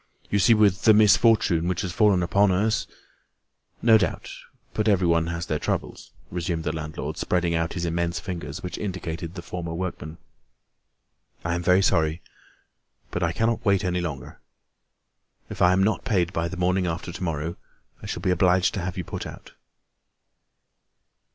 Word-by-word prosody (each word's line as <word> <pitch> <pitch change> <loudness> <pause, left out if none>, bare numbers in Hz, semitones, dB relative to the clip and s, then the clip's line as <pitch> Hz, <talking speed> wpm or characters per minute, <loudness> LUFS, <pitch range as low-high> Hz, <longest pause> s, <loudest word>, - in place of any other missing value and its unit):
"You 100 - +2
see, 115 +4 +5
with 105 -1 +3
the 110 -2 +7
misfortune 105 -5 +4
which 90 -1 -1
has 95 -3 -3
fallen 100 -5 +3
upon 100 +3 +3
us—" 110 +4 +1 1.0
"No 110 -1 +6
doubt, 90 -6 -2 0.4
but 105 0 -1
everyone 85 -5 +3
has 85 0 -3
their 75 -2 -2
troubles," - - -4 0.2
resumed 85 -2 -2
the 75 - -1
landlord, 80 -1 -5
spreading 90 -2 0
out 80 0 -1
his 85 -2 -3
immense 85 0 -1
fingers, 85 -3 -6
which 90 - -5
indicated 90 -3 -5
the 85 - -7
former 85 -1 -5
workman. 85 -3 -5 1.3
"I 85 - 0
am 85 - -1
very 90 +2 +4
sorry, 80 0 +1 0.9
but 90 - -3
I 85 -2 +1
cannot 115 +5 0
wait 100 -2 +2
any 90 0 0
longer. 70 -7 -6 1.1
If - - -6
I 90 - +6
am 95 +1 +3
not 110 +2 0
paid 95 -9 0
by 85 0 -1
the 95 - -6
morning 90 +1 +1
after 85 +1 -4
to 90 +2 -7
morrow, 80 0 -2 0.5
I - - -8
shall - - -5
be 90 - +2
obliged 90 +1 +3
to 100 - -3
have 90 +1 -4
you 90 - -2
put - - -6
out." - - -11
90 Hz, 170 wpm, -25 LUFS, 85-95 Hz, 1.3 s, the